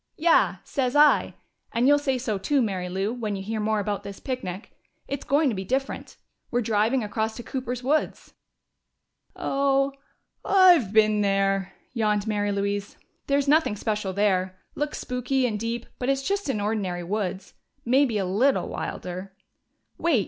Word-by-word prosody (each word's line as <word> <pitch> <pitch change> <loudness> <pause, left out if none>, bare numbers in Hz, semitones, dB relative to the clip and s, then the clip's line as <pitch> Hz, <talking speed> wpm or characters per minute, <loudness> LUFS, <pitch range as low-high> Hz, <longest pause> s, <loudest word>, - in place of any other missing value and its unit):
"Yeah! 335 +1 +4
Sez 255 -1 -1
I. 295 0 +5 0.4
And 235 +3 +2
you'll 290 +1 +6
say 270 -3 0
so 220 -5 -2
too, 280 +9 +1
Mary 190 -6 -1
Lou, 195 +4 -1
when 220 -4 -3
you 195 - -5
hear 220 +2 -3
more 215 0 +1
about 205 0 -2
this 200 -1 -9
picnic. 215 -7 -5 0.4
It's 280 0 -4
going 290 +3 +2
to 230 - -2
be 190 - -3
different. 265 +7 -3 0.3
We're 245 - 0
driving 220 +4 +1
across 220 +1 -2
to 240 - -7
Cooper's 250 -1 -4
woods 300 +4 -1 0.5
" - - -48
"Oh, 275 0 +1 0.5
I've 360 - +5
been 215 -1 +4
there," 195 -1 +1 0.2
yawned 210 -3 +1
Mary 205 -2 0
Louise. 200 0 -2 0.3
"There's 280 0 +1
nothing 305 -6 +3
special 210 -2 -2
there. 185 -2 +1 0.2
Looks 295 0 -3
spooky 250 +1 -1
and 215 -4 -1
deep, 230 +2 -3
but 250 - -1
it's 275 0 +1
just 400 -5 -1
an 220 - 0
ordinary 200 -4 -2
woods. 190 0 -3 0.3
Maybe 255 -2 +3
a 195 - 0
little 225 +10 +2
wilder 185 +2 -6 0.3
" - - -48
"Wait! 330 -8 +3
220 Hz, 165 wpm, -25 LUFS, 200-270 Hz, 0.5 s, you'll